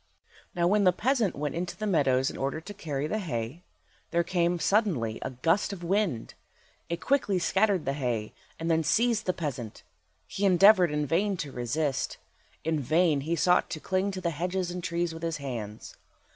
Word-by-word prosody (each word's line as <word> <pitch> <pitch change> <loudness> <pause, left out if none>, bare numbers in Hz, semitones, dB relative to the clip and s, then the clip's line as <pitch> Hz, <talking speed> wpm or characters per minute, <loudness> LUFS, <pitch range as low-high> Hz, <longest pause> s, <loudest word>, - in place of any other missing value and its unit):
Now 170 -1 +1
when 205 +3 +3
the 185 - +6
peasant 230 +1 +1
went 145 +1 -3
into 175 +1 -4
the 215 - -3
meadows 135 -8 +2
in - - -10
order 140 +3 -2
to 200 +6 -9
carry 150 -8 -3
the 215 +8 -1
hay, 125 - -4 0.5
there 170 0 +1
came 175 -1 +1
suddenly 165 - +1
a - - -3
gust 165 +11 +1
of 185 -3 -7
wind. 180 - 0 0.6
It 170 0 -2
quickly 205 -1 +1
scattered 195 0 +2
the 135 - 0
hay, 120 -6 -2 0.3
and 165 +1 -1
then 160 0 +2
seized 225 +4 +2
the - - +4
peasant. 130 -10 -5 0.4
He 200 - -5
endeavoured 190 -1 +6
in 150 0 -1
vain 190 +6 +1
to 140 - -9
resist; 130 +2 -2 0.5
in 160 -1 0
vain 155 +1 +2
he 160 +4 -1
sought 180 +2 +3
to 155 - -4
cling 190 +4 0
to 190 -1 -5
the 170 -1 0
hedges 180 +3 -2
and 180 0 -5
trees 170 0 -1
with 160 - -8
his 165 -1 -2
hands. 115 -7 -6
170 Hz, 185 wpm, -28 LUFS, 145-190 Hz, 0.6 s, the